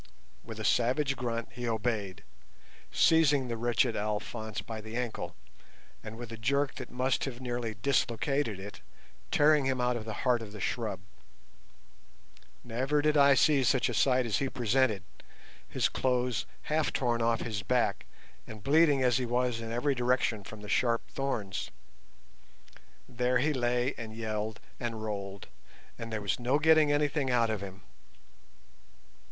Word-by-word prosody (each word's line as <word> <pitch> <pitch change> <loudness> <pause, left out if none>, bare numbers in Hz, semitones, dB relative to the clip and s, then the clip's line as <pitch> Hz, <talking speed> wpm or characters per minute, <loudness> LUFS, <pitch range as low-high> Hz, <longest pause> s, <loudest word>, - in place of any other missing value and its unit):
With 115 -1 -8
a 110 - -3
savage 135 +3 +2
grunt 115 -2 -3
he 120 0 -5
obeyed, 110 -4 -2 0.7
seizing 145 -5 +4
the 115 - -2
wretched 120 +1 +1
Alphonse 105 0 -3
by 110 +1 -6
the 110 +2 -6
ankle, 115 -8 -4 0.7
and 110 +1 -8
with 120 -1 -8
a 115 - -6
jerk 140 +4 +1
that - - -7
must 130 +1 0
have 125 -3 -6
nearly 120 -3 -3
dislocated 120 0 0
it, 100 +2 -9 0.5
tearing 150 -1 +4
him 130 -1 0
out 125 0 +1
of 110 -2 -5
the 110 - -4
heart 125 -2 +3
of 105 -2 -8
the 105 - -8
shrub. 105 -2 -2 1.6
Never 130 +5 0
did 150 0 +3
I 140 -1 +6
see 145 -1 +4
such 125 +1 +2
a - - -2
sight 130 +2 +3
as 110 -4 0
he 135 - -1
presented, 120 -5 +1 0.7
his - - +1
clothes 125 -2 0 0.2
half 155 0 0
torn 120 -3 0
off 115 0 +1
his 105 -3 -3
back, 110 -4 0 0.4
and 110 -2 -10
bleeding 145 -1 +4
as 125 -1 +3
he 125 - -2
was 120 -1 0
in 115 0 -5
every 125 +5 +1
direction 125 -4 +1
from 105 +2 -10
the 105 - -9
sharp 115 +2 +1
thorns. 115 -9 -3 1.4
There 125 0 +1
he 150 +5 +1
lay 125 0 +1
and 110 -2 -7
yelled 110 -1 -3 0.2
and 115 -3 -4
rolled, 100 -2 -5 0.5
and 115 0 -6
there 110 -2 -3
was 100 - -1
no 125 +4 +2
getting 155 -1 +5
anything 145 -1 +1
out 120 -2 +2
of 105 -3 -3
him. 95 -1 -9
120 Hz, 160 wpm, -30 LUFS, 110-130 Hz, 1.6 s, I